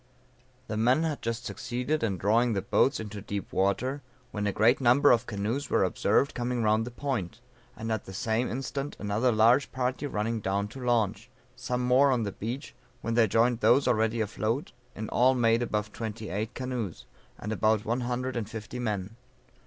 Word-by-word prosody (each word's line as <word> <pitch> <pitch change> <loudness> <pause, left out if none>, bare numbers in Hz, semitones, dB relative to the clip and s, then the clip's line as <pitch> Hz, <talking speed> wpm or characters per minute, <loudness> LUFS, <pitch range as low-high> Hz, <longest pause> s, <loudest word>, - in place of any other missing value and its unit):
The 110 - -4
men 125 +8 +3
had 155 -3 -2
just 115 +1 -3
succeeded 125 +5 -2
in 100 -5 0
drawing 115 +6 +2
the 95 - -1
boats 135 - +2
into 105 -2 -6
deep 100 0 -5
water, 125 +9 0 0.3
when 105 -1 -2
a - - +1
great 115 +7 +3
number 130 +4 +5
of 120 0 +2
canoes 115 +6 -2
were - - +3
observed 100 +8 +1
coming 120 -1 -1
round 110 +2 +2
the - - -3
point, 120 -8 -3 0.4
and 115 +1 -4
at 110 - -2
the - - -9
same 110 +5 0
instant 135 +3 -4
another 105 +5 +1
large 115 +5 +4
party 130 +2 -2
running 115 -2 -2
down 100 0 -1
to 130 +4 -9
launch; 115 -5 0 0.3
some 125 0 -2
more 125 +3 +4
on 125 -3 +1
the 100 - -2
beach, 120 +9 -6 0.3
when 115 - -2
they 115 -1 +4
joined 115 +3 +2
those 120 +5 +4
already 110 0 +2
afloat, 110 +5 -2 0.2
in 110 0 -5
all 130 +2 +4
made 115 -1 +3
above 105 -3 -2
twenty 110 -1 -5
eight 110 +6 -3
canoes, 125 -8 -4 0.3
and 105 - -5
about 110 -1 +1
one 120 +3 0
hundred 125 +1 -2
and 110 -3 -3
fifty 110 +2 -7
men. 105 -2 -3
115 Hz, 185 wpm, -28 LUFS, 105-125 Hz, 0.4 s, number